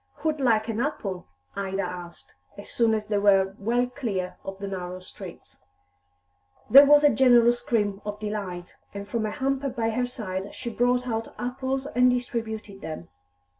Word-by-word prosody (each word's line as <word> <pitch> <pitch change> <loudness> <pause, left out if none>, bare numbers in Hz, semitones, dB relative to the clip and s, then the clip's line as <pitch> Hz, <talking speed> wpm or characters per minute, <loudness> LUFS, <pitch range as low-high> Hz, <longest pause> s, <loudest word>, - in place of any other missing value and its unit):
"Who'd 310 -1 0
like 225 -4 +2
an 225 -1 -2
apple?" 205 -9 -3 0.3
Ida 195 0 -2
asked, 175 -1 -8 0.2
as 200 - -10
soon 230 -2 +2
as 215 -1 -3
they 210 -1 0
were 195 -1 +4
well 240 +4 +1
clear 220 -8 -4
of 195 0 -6
the 200 0 -5
narrow 185 -1 -5
streets. 185 - -11 1.1
There 280 +2 +9
was 295 +1 +7
a 295 - +6
general 240 -2 +6
scream 210 -4 -1
of 210 0 -5
delight, 200 -5 -5 0.2
and 200 0 -6
from 220 +1 -1
a - - -2
hamper 275 +2 -1
by 225 -2 -1
her 245 +2 0
side 195 -5 -5
she 240 -2 -5
brought 245 +2 +1
out 225 -1 -3
apples 260 +2 -3
and 250 -3 +3
distributed 225 -5 -3
them. 155 0 -7
220 Hz, 170 wpm, -26 LUFS, 195-250 Hz, 1.1 s, There